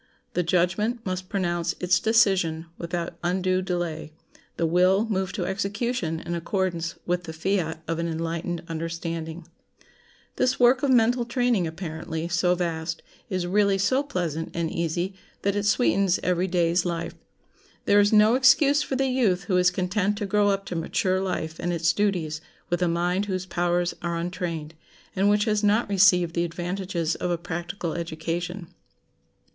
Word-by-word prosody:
The 180 - +1
judgment 185 +7 0
must 185 0 -4
pronounce 175 -4 -1
its 180 0 +3
decision 190 -8 +2
without 170 0 -4
undue 185 +1 +1
delay; 175 -4 -3 0.5
the 170 - +1
will 185 +5 +3
move 190 -3 -1
to 185 -4 -2
execution 200 -2 -2
in 170 - -5
accordance 170 -1 -2
with 175 0 -1
the 160 - -6
fiat 165 -1 -1
of 165 0 -2
an 170 - -1
enlightened 165 +1 -3
understanding. 165 0 -5 0.9
This 255 - +1
work 250 +1 +5
of 280 - +1
mental 245 0 +4
training, 235 -6 +1
apparently 160 -1 -5
so 180 +1 +2
vast, 165 -1 -3 0.3
is 185 -2 -1
really 200 +2 +2
so 255 +8 +2
pleasant 170 - -3
and 170 -1 -1
easy 170 +3 -2 0.3
that 200 0 +1
it 205 0 0
sweetens 200 -5 +3
every 180 +1 +1
day's 175 -1 +2
life. 170 -2 -3 0.7
There 205 - +5
is 205 0 +4
no 215 +1 +6
excuse 275 +3 +5
for 275 - -2
the 270 +1 +1
youth 235 -8 +1
who 185 -3 +1
is 180 0 +5
content 190 +3 0
to 205 - -2
grow 205 +1 +2
up 195 0 0
to 180 - -5
mature 185 +3 0
life 165 -4 -3
and 175 - -1
its 165 -1 +2
duties 170 -7 -1 0.3
with 175 - 0
a 180 - +3
mind 175 +4 0
whose 185 -2 -2
powers 175 0 0
are 170 -1 -2
untrained, 170 -3 -4 0.4
and 195 +1 +3
which 210 +1 +3
has 215 -1 +1
not 210 +3 +3
received 180 -3 +4
the 170 - +1
advantages 175 -1 -2
of 180 - -3
a 175 - 0
practical 175 +1 -4
education. 170 +2 -4
180 Hz, 160 wpm, -25 LUFS, 170-200 Hz, 0.9 s, no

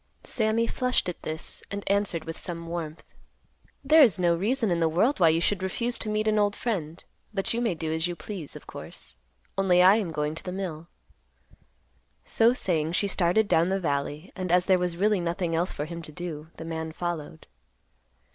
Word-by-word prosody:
Sammy 220 0 +1
flushed 250 -4 +1
at 175 - -7
this, 155 +1 -3
and 200 0 -4
answered 200 -5 +1
with 165 0 -5
some 170 -2 -5
warmth, 165 -2 -5 0.8
"There 310 +3 +6
is 225 - +6
no 175 -2 +3
reason 220 +4 0
in 170 - +1
the 165 -1 +3
world 220 - +2
why 170 -3 +6
you 160 +1 +3
should 190 +3 0
refuse 235 +6 -1
to 215 - -2
meet 215 +1 0
an 215 0 +3
old 205 -1 +2
friend; 170 -8 -3 0.3
but 195 +2 0
you 235 - -1
may 225 -7 +1
do 160 0 -3
as 160 +1 +1
you 175 - -4
please, 175 -4 -7
of - - -10
course. - - -9 0.4
Only 180 -2 +5
I 190 +3 +7
am 205 -6 -1
going 150 -1 -1
to 160 - -9
the 180 - -4
mill." 175 -4 -5 1.4
So 230 +1 +4
saying, 165 -9 0
she 200 - +2
started 195 +3 +2
down 170 0 +3
the 195 +1 +1
valley, 145 0 -2
and 185 -2 -3
as 180 0 +4
there 185 -1 +4
was 180 -1 -1
really 205 +1 +3
nothing 170 0 -1
else 170 +3 +1
for 150 - -4
him 170 +1 -6
to 155 - -7
do, 160 -2 -6
the 160 - -7
man 160 -1 -4
followed. 165 - -5
180 Hz, 205 wpm, -27 LUFS, 165-205 Hz, 1.4 s, I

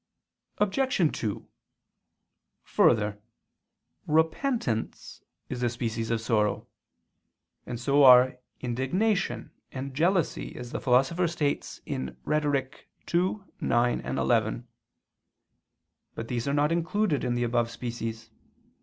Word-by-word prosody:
Obj. 210 - +1
2: 105 -3 -3 1.2
Further, 105 -1 +2 0.9
Repentance 160 - -1 0.3
is 125 -1 -5
a 120 - +2
species 115 -1 -3
of 115 -1 +1
sorrow; 110 -3 0 1.0
and 120 - -5
so 140 +4 +3
are 125 0 +7 0.2
indignation 175 - -1 0.2
and 135 +1 -5
jealousy, 170 +3 0
as 120 -1 -8
the - - -4
Philosopher 135 +8 +3
states 160 -4 -2
(Rhet. 135 - -1 0.5
ii, 180 +3 +2 0.3
9, 120 +1 +2
11). 115 +1 0 1.5
But 115 - -5
these 120 +1 -2
are 140 - +1
not 150 +2 +2
included 170 -1 0
in 120 -1 0
the 120 - 0
above 120 0 +1
species. 115 -1 -6
125 Hz, 100 wpm, -27 LUFS, 115-160 Hz, 1.5 s, are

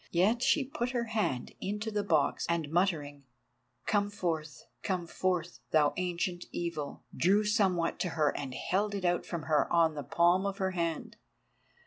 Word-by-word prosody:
Yet 205 +8 +2
she 275 +2 +3
put 245 -2 -3
her 235 - +1
hand 140 - -1
into 210 +3 -3
the 210 -1 0
box, 160 -7 +1
and 165 -3 -1
muttering 155 -5 0 0.6
"Come 205 -1 +1
forth—come 170 0 -3
forth, 175 -1 -2
thou 150 -2 +3
Ancient 175 0 -2
Evil," 165 -4 -4
drew 200 +5 +3
somewhat 195 -6 +1
to 180 - 0
her 150 -2 +2
and 135 -3 -4
held 205 +7 0
it 195 -2 -3
out 175 0 +1
from 170 -3 -4
her 155 -2 +1
on 165 -2 +4
the 150 - -4
palm 175 +7 +3
of 200 0 -3
her 190 -2 0
hand. 170 -3 -3
175 Hz, 160 wpm, -31 LUFS, 160-200 Hz, 0.6 s, on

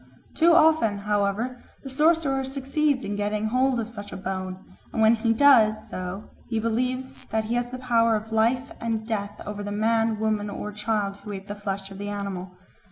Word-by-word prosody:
Too 335 +1 +5
often, 310 -11 +5
however, 210 +4 -1 0.2
the 270 - -6
sorcerer 300 -2 +2
succeeds 275 +1 0
in 205 - -3
getting 210 +1 -1
hold 255 +1 +2
of 225 - -2
such 210 -3 -9
a - - -6
bone, 185 -1 -4 0.3
and 225 - -3
when 220 +1 +6
he 230 0 +1
does 225 -4 +5
so 185 +3 -6 0.2
he 225 - -1
believes 250 +4 -2
that 220 0 -1
he 220 +2 -3
has 245 0 0
the 255 - -6
power 230 -3 +3
of 220 +1 -4
life 235 +5 +1
and 225 -1 -2
death 205 -2 -3
over 205 0 -5
the 205 0 -4
man, 225 +1 +1
woman, 215 -1 0
or 210 +1 -5
child 210 -1 -1
who 210 - -9
ate 195 0 -7
the 205 - -4
flesh 195 -1 -5
of 195 - -9
the 205 0 -4
animal. 190 -3 -5
220 Hz, 195 wpm, -25 LUFS, 205-250 Hz, 0.3 s, when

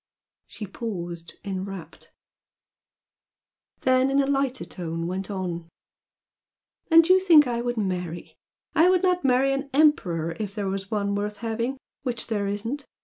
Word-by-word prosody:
She 210 - -7
paused, 175 -5 -6
enrapt; 190 -4 -6 1.7
then 260 0 +3
in 275 +1 +2
a 275 - +3
lighter 270 -8 0
tone 165 -1 -5
went 185 +3 -3
on 175 -4 -4 1.2
"And 330 0 +7
you 370 +1 +6
think 335 -6 +7
I 240 -1 -1
would 240 0 -2
marry? 180 -4 -3 0.4
I 330 +3 +5
would 370 0 +3
not 360 -1 +2
marry 265 +1 +3
an 275 +1 -3
emperor 175 - +2
if 205 -2 -4
there 205 -2 -2
were 195 +1 -1
one 200 -2 -1
worth 205 +1 -2
having 230 +4 -2 0.2
which 245 -4 -2
there 205 -3 -1
isn't! 230 +8 -3
215 Hz, 145 wpm, -25 LUFS, 185-275 Hz, 1.7 s, And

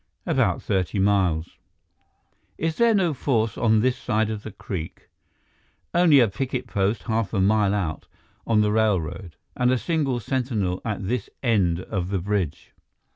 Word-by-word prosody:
"About - - +1
thirty 95 0 -1
miles." 95 -5 +1 1.0
"Is 160 0 -2
there 235 -1 +4
no 180 -5 +2
force 115 -5 0
on 110 -2 +3
this 125 +1 +2
side 110 -3 -1
of 105 -1 -4
the 110 - -7
creek?" 85 -4 -7 0.8
"Only 170 -5 +6
a 120 - +5
picket 125 +5 -3
post 100 +1 -1
half 115 -2 -1
a - - +1
mile 105 +1 +3
out, 85 -6 -3 0.4
on 110 -2 +3
the 105 0 +2
railroad, 90 -6 0 0.2
and 125 -1 +2
a 130 - +3
single 140 -4 -1
sentinel 115 -8 -2
at 105 -5 -3
this 120 -1 -2
end 95 -8 +2
of 90 -2 -3
the 100 - 0
bridge." 95 -4 -3
110 Hz, 155 wpm, -24 LUFS, 95-125 Hz, 1.0 s, Only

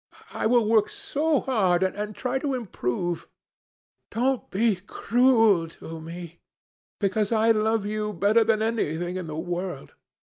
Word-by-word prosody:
I - - 0
will 235 -2 +3
work 215 -1 +3
so 300 0 0
hard 190 -8 +2
and 210 +2 -2
try 255 +1 -2
to 275 -1 -1
improve. 175 - -3 0.8
Don't 255 +2 -1
be 215 0 +1
cruel 225 -3 +3
to 165 0 -9
me, 170 +1 -9 0.6
because 205 +1 0
I 225 0 +4
love 220 -1 +1
you 210 0 -2
better 210 +4 +3
than 220 -1 +1
anything 175 -6 -1
in 185 -3 -4
the 155 0 -5
world. 175 -3 -4
210 Hz, 140 wpm, -25 LUFS, 175-230 Hz, 0.8 s, I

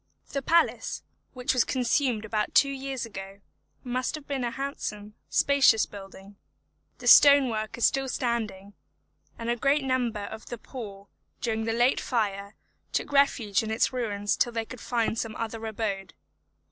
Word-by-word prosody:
The 275 - -2
palace, 335 +5 +1 0.3
which 250 -1 -1
was 250 -3 +4
consumed 250 -3 0
about 215 -1 -2
two 275 - +5
years 270 -2 -4
ago, 195 -2 -9 0.4
must 255 +2 -2
have 305 -2 -9
been 275 -3 -2
a 240 - 0
handsome, 215 -6 -5 0.2
spacious 275 -6 +4
building; 195 0 -12 0.6
the - - -11
stone 285 -2 +8
work 215 0 -3
is 235 - +3
still 270 -1 +1
standing, 220 -6 -3 0.6
and 230 - -6
a 240 - +1
great 275 +4 +2
number 250 -5 0
of 220 +2 -8
the 240 - -6
poor, 205 -5 -9 0.3
during 225 -2 -1
the 225 - 0
late 245 +3 +3
fire, 200 -4 -2 0.4
took - - -2
refuge 260 -8 +3
in 220 - -5
its 220 +4 +1
ruins 205 -5 -1
till 240 - +1
they 225 -1 -2
could 250 +1 -10
find 230 -2 -1
some 225 -1 -4
other 225 0 -5
abode. 205 -3 -4
230 Hz, 160 wpm, -27 LUFS, 210-260 Hz, 0.6 s, stone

